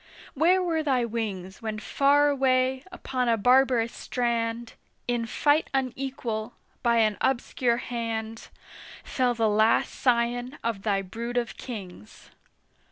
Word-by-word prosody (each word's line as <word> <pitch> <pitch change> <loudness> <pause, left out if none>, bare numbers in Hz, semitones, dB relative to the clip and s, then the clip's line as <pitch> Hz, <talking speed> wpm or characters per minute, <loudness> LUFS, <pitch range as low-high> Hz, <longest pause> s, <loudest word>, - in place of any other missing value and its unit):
where 355 +6 +3
were 330 -3 0
thy 260 -5 +1
wings 205 -5 -5
When 220 -1 -4
far 285 +6 +3
away 260 -1 +1
upon 255 -8 -2
a 230 - +3
barbarous 245 0 +3
strand, 235 -1 -2 0.3
In 240 -1 -1
fight 295 +6 +2
unequal, 255 -3 -3 0.3
by 235 -1 +2
an 215 -2 +2
obscure 245 -2 +1
hand, 225 -2 -4 0.6
Fell 250 -2 0
the 225 -1 +2
last 215 +2 +3
scion 245 +2 0
of 230 -4 -2
thy 195 -2 0
brood 235 +6 -5
of 240 -2 -1
Kings! 190 - -10
240 Hz, 125 wpm, -26 LUFS, 225-260 Hz, 0.6 s, where